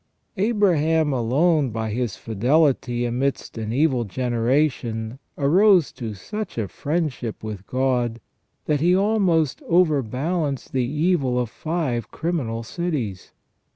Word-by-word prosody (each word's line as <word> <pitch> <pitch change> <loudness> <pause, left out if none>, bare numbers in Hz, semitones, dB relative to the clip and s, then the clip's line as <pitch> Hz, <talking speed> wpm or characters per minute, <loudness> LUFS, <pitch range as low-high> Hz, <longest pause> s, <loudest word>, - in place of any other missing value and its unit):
Abraham 165 -8 +2
alone 140 +5 +2
by 110 -1 -3
his 120 -1 -2
fidelity 120 +1 +1
amidst 130 +3 -2
an 110 -1 -4
evil 130 -1 +2
generation 120 0 -1 0.2
arose 180 +4 +4
to 110 -4 -6
such 210 - -6
a 110 -3 -1
friendship 145 - -3
with 105 -3 -6
God 125 -3 0 0.5
that 150 -2 +1
he 175 +2 +4
almost 190 -8 +2
overbalanced 150 -2 +1
the 130 -2 +1
evil 150 -4 +1
of 120 -3 -2
five 150 - -2
criminal 135 -10 -2
cities. 120 - -4
135 Hz, 115 wpm, -23 LUFS, 120-165 Hz, 0.5 s, arose